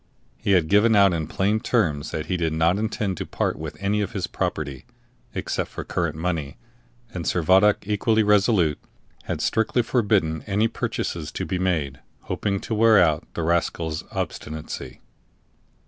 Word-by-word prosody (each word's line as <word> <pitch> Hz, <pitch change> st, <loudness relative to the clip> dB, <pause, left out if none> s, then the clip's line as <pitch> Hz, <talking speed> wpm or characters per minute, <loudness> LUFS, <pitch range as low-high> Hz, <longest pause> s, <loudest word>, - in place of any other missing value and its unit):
He 100 Hz, -, +1 dB
had 90 Hz, -4 st, +3 dB
given 105 Hz, +5 st, +4 dB
out 100 Hz, -2 st, +6 dB
in 80 Hz, -2 st, -2 dB
plain 105 Hz, +3 st, +1 dB
terms 80 Hz, -, 0 dB
that 75 Hz, -1 st, -4 dB
he 90 Hz, -, -1 dB
did 80 Hz, -3 st, -1 dB
not 85 Hz, +4 st, +2 dB
intend 105 Hz, -4 st, -2 dB
to -, -, -4 dB
part -, -, -1 dB
with -, -, -7 dB
any 100 Hz, +2 st, 0 dB
of 100 Hz, -, -3 dB
his 95 Hz, -4 st, -2 dB
property, 70 Hz, -4 st, -4 dB, 0.5 s
except -, -, -2 dB
for -, -, -6 dB
current 85 Hz, -3 st, -2 dB
money, 80 Hz, -4 st, -3 dB, 0.6 s
and 85 Hz, -, -4 dB
Servadac, 95 Hz, +5 st, +3 dB
equally 110 Hz, +2 st, +2 dB
resolute, 100 Hz, -7 st, +3 dB, 0.5 s
had -, -, -3 dB
strictly 115 Hz, +2 st, +1 dB
forbidden 100 Hz, -10 st, +1 dB
any 105 Hz, +2 st, +2 dB
purchases 80 Hz, -7 st, -3 dB
to -, -, -3 dB
be 90 Hz, -, -2 dB
made, 80 Hz, -7 st, -1 dB, 0.2 s
hoping 100 Hz, -2 st, -2 dB
to 115 Hz, -, -4 dB
wear 110 Hz, 0 st, +5 dB
out 80 Hz, -3 st, +2 dB
the 85 Hz, -, -2 dB
rascal's 80 Hz, -1 st, -1 dB
obstinacy. 80 Hz, 0 st, -5 dB
90 Hz, 160 wpm, -24 LUFS, 80-105 Hz, 0.6 s, out